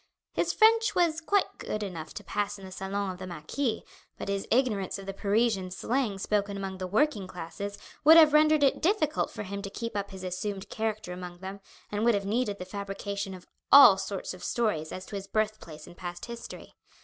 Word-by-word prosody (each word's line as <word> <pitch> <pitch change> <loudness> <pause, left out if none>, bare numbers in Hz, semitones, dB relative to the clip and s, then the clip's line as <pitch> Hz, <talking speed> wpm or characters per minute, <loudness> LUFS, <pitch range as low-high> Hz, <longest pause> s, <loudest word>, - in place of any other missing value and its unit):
His - - +1
French 445 -1 +4
was 335 -3 +2
quite 400 +5 +1
good 215 - -3
enough 165 -5 -6
to - - -6
pass 205 0 -2
in 195 - -11
the 190 - -10
salon 195 +1 -3
of 180 - -9
the 185 - -6
marquis, 215 - -3 0.3
but - - -5
his 200 0 -2
ignorance 225 -7 +1
of 195 - -9
the 195 - -4
Parisian 200 -1 +1
slang 225 +2 -1
spoken 200 0 -1
among 190 -1 -5
the 185 - -3
working 210 -1 +1
classes 190 +3 -6 0.3
would 320 +3 +9
have 310 -2 +8
rendered 305 0 +5
it 275 - +3
difficult 320 -5 +1
for - - -6
him 200 0 -5
to 200 - -5
keep 230 +2 -5
up 200 -1 -2
his 190 -1 -9
assumed 190 +2 -4
character 215 -4 -3
among 180 -1 -8
them, 190 +2 -7 0.3
and 210 +1 -1
would 235 -1 +4
have 200 -1 -2
needed 210 0 0
the 180 - -6
fabrication 200 0 -5
of 180 - -13 0.3
all 275 -8 +10
sorts 195 0 -4
of 185 - -11
stories 210 -10 -1
as 185 - -6
to - - -8
his 195 0 -5
birthplace 210 -7 -2
and 175 -1 -14
past 175 -1 -6
history. 235 -1 -9
200 Hz, 210 wpm, -29 LUFS, 190-235 Hz, 0.3 s, all